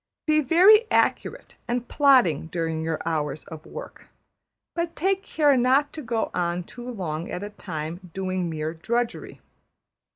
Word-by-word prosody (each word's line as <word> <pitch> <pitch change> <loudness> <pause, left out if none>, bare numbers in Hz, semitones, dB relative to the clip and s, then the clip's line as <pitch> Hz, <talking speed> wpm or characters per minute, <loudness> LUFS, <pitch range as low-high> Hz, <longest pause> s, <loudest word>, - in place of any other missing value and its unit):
Be 310 0 +3
very 385 - +6
accurate - - 0
and 245 0 -2
plodding 250 - +4
during 165 -1 -2
your 160 -1 -2
hours 150 -2 -2
of 160 -2 -10
work, - - -10 0.7
but 335 0 -3
take 385 +3 +1
care 295 -6 +2
not 260 +4 +3
to 310 - -6
go 230 -4 -2
on 175 0 -1
too 240 +7 -9
long 170 -8 -4
at 180 - -5
a 205 - -6
time 175 -1 -6
doing 185 -1 -2
mere 155 0 -3
drudgery. 235 +8 -3
195 Hz, 150 wpm, -25 LUFS, -, 0.7 s, very